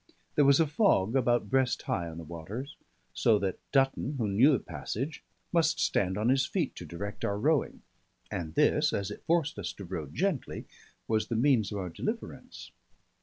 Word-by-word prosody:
There 145 - +4
was 140 +1 +6
a 165 - +5
fog 145 - +2
about 120 -2 +2
breast 130 -3 +2
high 85 -2 -2
on 80 - -9
the 85 - -6
waters; 85 - -7 0.4
so 110 - +3
that 95 -2 -2
Dutton, 135 +1 +1
who 115 -4 0
knew 110 +9 +5
the 135 - +4
passage, 140 +7 -5 0.3
must 170 -2 +3
stand 95 0 +1
on 110 +3 +1
his 135 0 +4
feet - - -1
to - - -7
direct 100 +4 -6
our 100 - 0
rowing; 150 +5 0 0.5
and 80 -2 -4
this, - - +3
as 100 0 -2
it - - -9
forced 165 -8 +1
us 95 - -3
to 100 - -9
row 85 -4 -5
gently, 180 - -2 0.4
was 110 -1 +1
the 115 - -2
means 115 -4 +3
of 105 - -3
our 95 -2 -3
deliverance. 215 - -6
115 Hz, 185 wpm, -30 LUFS, 100-140 Hz, 0.5 s, was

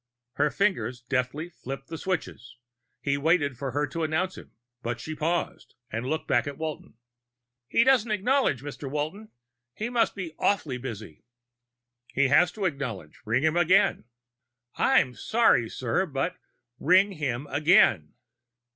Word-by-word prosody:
Her 150 +1 +2
fingers 125 - 0
deftly 130 +5 -2
flipped 135 -3 -8
the 165 - -5
switches. 130 - -4 0.4
He 140 0 0
waited 145 -3 +2
for 135 +2 -4
her 145 +4 0
to 165 +4 -5
announce 165 +4 -1
him, - - -12 0.3
but 120 0 -3
she 155 - -5
paused 165 +3 -2 0.2
and 115 +3 -3
looked 155 +3 -2
back - - +2
at 140 -1 -5
Walton. 155 -7 -6 0.7
"He 230 - +4
doesn't 255 -3 +3
acknowledge, 215 - +1
Mr. 145 -1 -6
Walton. 155 +10 -4 0.5
He 220 +3 -3
must 240 -2 +1
be 180 -5 -6
awfully 155 -11 0
busy." 110 - -8 0.8
"He 140 0 +1
has 170 +5 +5
to 205 -3 -3
acknowledge. 125 - -4
Ring 115 +5 +1
him 160 +1 +2
again." 175 - +3 0.7
"I'm 125 - +3
sorry, 125 - +2
sir, 130 +10 -1
but 150 +5 -2 0.2
" 120 +1 -35
"_Ring 185 +3 +4
him 135 -2 -2
again. 150 - +4
150 Hz, 145 wpm, -27 LUFS, 125-180 Hz, 0.8 s, has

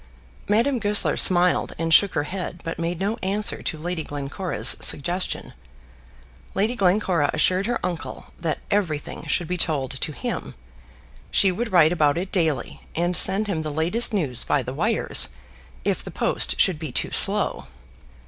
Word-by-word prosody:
Madame 235 +5 +2
Goesler 205 -1 +2
smiled, 180 -1 +3
and 165 0 0
shook 200 +2 +6
her 145 - +1
head, 180 +1 -6
but 165 - -5
made 170 0 -2
no 205 +4 -1
answer 200 +2 -1
to 160 - -3
Lady 170 +1 -4
Glencora's 145 +6 -1
suggestion. 175 +6 +1 1.0
Lady 215 +5 +1
Glencora 180 -7 +1
assured 185 +3 +2
her 245 - -1
uncle 175 -2 -5
that 165 -3 -3
everything 165 -8 -2
should 175 - 0
be 180 - -2
told 150 -6 +1
to 135 +3 -3
him. 240 - -5 0.7
She 195 -3 +4
would 225 +5 -4
write 165 -3 +5
about 150 -3 +2
it 185 +2 -4
daily, 160 -9 -1
and 175 +2 0
send 200 +4 +4
him 185 -6 -2
the 155 - -4
latest 170 +12 +1
news 150 - -1
by - - 0
the - - -6
wires - - +1 0.6
if - - 0
the - - -7
post - - -1
should 180 -5 +3
be 155 -4 -5
too - - -1
slow. - - +2
175 Hz, 160 wpm, -23 LUFS, 160-195 Hz, 1.0 s, shook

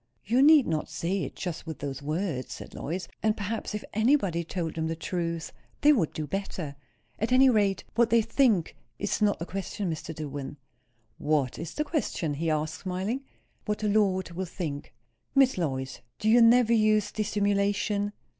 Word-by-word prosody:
"You 240 +6 +3
need 295 -1 +7
not 155 -2 -2
say 170 +5 -2
it - - -8
just 175 -3 -5
with 160 - -5
those 140 -1 -5
words," 155 -2 -2
said - - -10
Lois. 180 +5 -4
"And 215 0 +1
perhaps, 210 +1 -3
if 210 - -4
anybody 220 - +2
told 165 -1 -3
them 160 0 -2
the 165 - -2
truth, 165 0 -3 0.3
they 300 +1 +7
would 185 - +1
do 155 - -4
better. 175 -5 -4 0.4
At 220 +3 -1
any 260 +1 +6
rate, 205 -4 +2
what 235 0 +3
they 230 0 +4
think 225 - +2 0.2
is 205 +1 -2
not 205 -1 +3
the 170 - -5
question, 195 0 -3
Mr. 160 0 -5
Dillwyn." 145 -2 -6 0.6
"What 145 -4 0
is 165 0 -6
the 300 - 0
question?" 270 - -2
he 160 +3 -1
asked, 155 +2 -1
smiling. 190 +7 -2 0.4
"What 210 -1 -1
the 215 - -1
Lord 195 -4 +2
will 185 +2 -3
think." 160 -5 -5 0.4
"Miss 270 -1 +5
Lois, 130 -7 -3 0.2
do 215 - 0
you 235 +2 +6
never 235 0 +6
use 215 -2 +3
dissimulation?" 205 0 0
190 Hz, 175 wpm, -28 LUFS, 160-215 Hz, 0.6 s, need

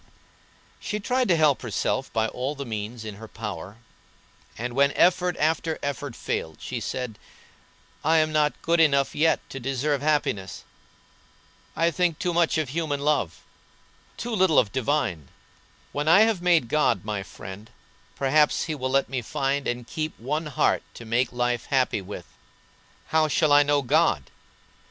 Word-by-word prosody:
She 210 - -3
tried 250 +4 0
to 180 - +4
help 155 -4 +3
herself 130 +3 -2
by 110 0 +1
all 130 +6 -3
the 140 0 -6
means 110 0 -5
in 105 -2 -7
her 110 +1 -10
power, 105 -3 -7 0.8
and 120 +2 -4
when 140 +2 +3
effort 180 -1 +3
after 160 +1 0
effort 145 -3 -4
failed 80 -1 -3
she - - -4
said: 125 -5 -4 0.8
"I 160 +2 +4
am 155 0 +2
not 150 -1 +1
good 170 +1 +2
enough 140 -4 +3
yet 160 +2 +2
to 135 - -5
deserve 135 +2 -1
happiness. 145 -10 -1 1.1
I 165 +1 +2
think 170 -1 +1
too 175 -1 -1
much 170 -1 +2
of 155 -5 -1
human 150 -1 -2
love, 140 - 0 0.7
too 240 0 -4
little 190 -6 +3
of 105 -6 +4
divine. 120 - -1 0.6
When 145 +1 -3
I 175 +6 +7
have 220 -5 +3
made 175 -8 +3
God 120 -8 +1
my 105 -2 -2
friend 95 +2 -10 0.5
perhaps 150 +2 +3
He 160 - -3
will 130 -3 -3
let 135 +1 +2
me 130 -1 -3
find 140 +2 -1
and 120 0 -3
keep 155 +5 -4
one 150 +7 -2
heart 145 - +1
to 120 - -10
make 120 +3 +1
life 120 -1 -1
happy 130 -6 +1
with. 95 +2 -8 0.8
How 160 0 +3
shall 155 +1 +2
I 145 - +8
know 145 -1 +2
God? 130 - +2
140 Hz, 160 wpm, -25 LUFS, 120-155 Hz, 1.1 s, I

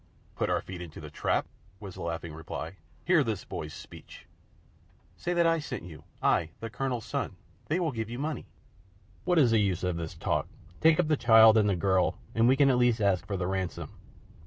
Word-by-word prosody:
"Put - - -1
our - - +1
feet 90 -2 -8
into 85 -3 -9
the - - -9
trap?" - - 0 0.3
was 100 -3 -8
the - - -9
laughing 85 -1 -4
reply. 80 +2 -7 0.3
"Hear 175 -5 +4
this 110 -6 -3
boy's - - -6
speech!" - - -12 0.9
"Say 175 - -3
that 170 -1 +3
I 165 0 +3
sent 150 - -6
you 80 -4 -11 0.2
I, 80 - +2
the 115 -1 -6
Colonel's 125 -3 -3
son. - - -3 0.3
They 160 +4 0
will 165 -4 0
give 110 -3 -4
you 120 - -5
money." 150 +3 -4 0.8
"What 180 - +2
is 130 -7 +5
the 115 - +4
use 95 -4 0
of 90 -2 -1
this 80 -1 -5
talk? - - -1 0.3
Take 160 0 +5
up 175 - +3
the 155 -1 +2
child 110 -2 +7
and 105 -2 +4
the 100 - +2
girl, 95 0 +1 0.2
and 115 +1 +3
we 130 - +5
can 140 -1 +5
at 125 - +2
least 120 -2 +3
ask 100 -3 +1
for 100 - -2
the 90 - -2
ransom. 95 -1 -3
110 Hz, 210 wpm, -29 LUFS, 90-135 Hz, 0.9 s, child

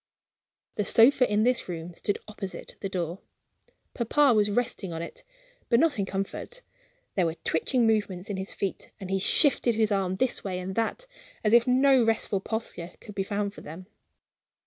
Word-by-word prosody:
The 210 - +1
sofa 245 +4 +5
in 210 +1 +3
this 245 -4 +1
room 170 0 -5
stood 205 +4 -2
opposite 200 -3 -8
the 195 - -4
door. 175 -1 -3 0.7
Papa 265 +3 +3
was 210 -1 +3
resting 220 -4 -1
on 165 0 -4
it, 170 - -9 0.5
but 235 - +5
not 300 -6 +2
in 195 - 0
comfort. 195 - -4 0.5
There 180 -3 +2
were 160 - -3
twitching 235 +10 +1
movements 205 -4 0
in 205 - -3
his 190 +1 -4
feet, 195 -2 -4
and 190 -2 -6
he 195 - +1
shifted 245 - +3
his 220 -1 +2
arms 190 -2 0
this 260 +4 0
way 185 -2 -3
and 185 +1 -4
that 230 - -2 0.4
as 215 0 +2
if 235 +1 +6
no 260 0 +5
restful 225 -3 +1
posture 190 -5 -5
could 210 - -11
he 195 - 0
found 200 0 -2
for - - -11
them. 165 +4 -9
205 Hz, 180 wpm, -27 LUFS, 190-235 Hz, 0.7 s, if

